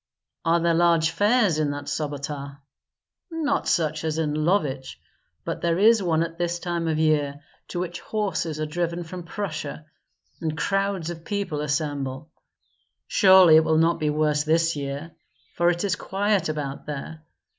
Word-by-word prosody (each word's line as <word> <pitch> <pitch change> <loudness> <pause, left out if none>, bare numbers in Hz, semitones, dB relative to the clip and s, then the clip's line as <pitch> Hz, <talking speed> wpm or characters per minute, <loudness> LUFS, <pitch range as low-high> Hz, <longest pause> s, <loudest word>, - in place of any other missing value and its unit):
"Are 165 +1 +3
there 170 0 +2
large 165 -1 +3
fairs 205 -1 +2
in 150 -2 +1
that 145 0 -5
Sobota?" 140 -1 -4 0.7
"Not 315 -4 -1
such 155 -2 0
as 160 -1 -1
in 155 -2 0
Lovich; 150 - -1 0.5
but - - -4
there 170 0 +1
is 220 +2 +5
one 165 -3 +1
at 165 0 -7
this 175 0 -1
time 170 -1 -3
of 160 -1 0
year, 145 -2 +1 0.3
to 175 - -4
which 175 -1 -4
horses 175 -7 -2
are 155 - -1
driven 170 +2 -2
from 180 +2 -7
Prussia, 155 -6 -5 0.6
and 160 -1 -2
crowds 195 -2 -1
of 165 -1 -9
people 190 -5 -3
assemble. 145 -1 -3 0.8
Surely 190 -6 +7
it 160 - +5
will 160 0 +2
not 165 +1 +3
be 155 -1 0
worse 150 0 +1
this 165 +1 +2
year, 140 +3 -5 0.4
for 175 0 +2
it 175 +1 -1
is 195 -3 +1
quiet 195 -3 0
about 145 -2 -4
there. 150 +2 -6
165 Hz, 160 wpm, -24 LUFS, 150-175 Hz, 0.8 s, Surely